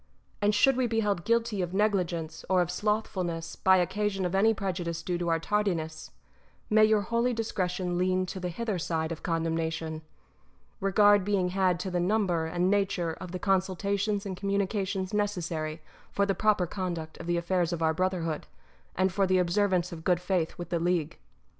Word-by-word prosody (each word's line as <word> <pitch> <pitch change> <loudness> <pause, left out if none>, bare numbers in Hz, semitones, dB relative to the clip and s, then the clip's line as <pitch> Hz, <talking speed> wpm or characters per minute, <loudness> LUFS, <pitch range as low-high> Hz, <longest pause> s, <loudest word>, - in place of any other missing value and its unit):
And 205 0 +3
should 270 +5 +4
we 255 -1 +2
be 225 -1 0
held 200 -4 -1
guilty 230 -3 +1
of 180 +1 -3
negligence 175 -6 0
or 185 -1 +4
of 175 - -5
slothfulness 185 -5 -2
by 190 0 +4
occasion 195 +1 0
of 180 - -2
any 205 +4 +4
prejudice 175 -5 -3
due 175 0 -2
to 175 -1 -1
our 165 - +3
tardiness, 165 -4 -2 0.6
may 215 0 +6
your 215 -1 +3
holy 235 +4 0
discretion 185 -5 -2
lean 185 0 +1
to 185 +1 -6
the 180 -1 -3
hither 205 +1 -3
side 160 -1 -2
of 165 - -5
con 165 -3 -1
demnation, 165 -1 -2 0.8
regard 205 0 +5
being 190 -2 +1
had 185 -2 +1
to 190 - -4
the 180 - 0
number 180 -3 +1
and 175 +3 +1
nature 195 -5 0
of 180 -2 -7
the 185 - -3
consultations 195 +2 0
and 190 -2 -4
communications 195 -1 -1
necessary 170 -6 -2 0.3
for 200 - +1
the 195 - +1
proper 210 -2 +2
conduct 170 -3 -5
of 170 - -7
the 175 0 +1
affairs 175 0 0
of 170 -1 -2
our 160 0 +3
brotherhood, 170 -3 -1 0.5
and 185 0 +1
for 195 0 +2
the 185 0 +3
observance 180 0 +1
of 165 -2 -8
good 180 -1 +2
faith 180 -2 -1
with 175 - -6
the 170 - 0
league. 170 -2 -1
185 Hz, 185 wpm, -28 LUFS, 170-200 Hz, 0.8 s, may